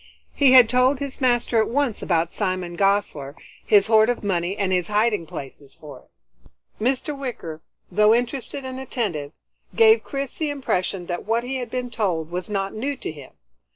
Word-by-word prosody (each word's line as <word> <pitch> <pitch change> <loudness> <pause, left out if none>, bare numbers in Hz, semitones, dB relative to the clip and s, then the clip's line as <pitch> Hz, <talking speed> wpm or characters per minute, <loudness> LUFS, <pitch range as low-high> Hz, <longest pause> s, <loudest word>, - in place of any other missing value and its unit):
He 275 -3 +4
had 250 -3 +9
told 250 +3 +3
his 280 0 -6
master 240 -2 +2
at - - -1
once 270 -3 0
about 170 -2 0
Simon 185 -3 -2
Gosler, 170 -8 0 0.3
his 205 -2 +4
horde 220 0 +4
of 245 - -2
money 185 -1 -1
and 195 -2 0
his 180 -2 0
hiding 210 -4 +1
places 140 -1 -9
for 145 -4 -11
it. - - -18
Mr. 265 +4 0
Wicker 235 - -6 0.3
though 210 +1 +4
interested 245 +3 -1
and 260 0 -6
attentive, 195 - -3 0.4
gave 450 0 +6
Chris 275 -2 -5
the 310 -2 0
impression 195 -10 -2
that 175 +2 -5
what 230 +1 +1
he 265 +2 -3
had 245 -2 -5
been 250 0 -4
told 175 -8 -2
was 180 +3 -4
not 195 -1 -2
new 270 +6 -3
to - - -5
him. 145 -4 -13
215 Hz, 180 wpm, -23 LUFS, 175-255 Hz, 0.4 s, had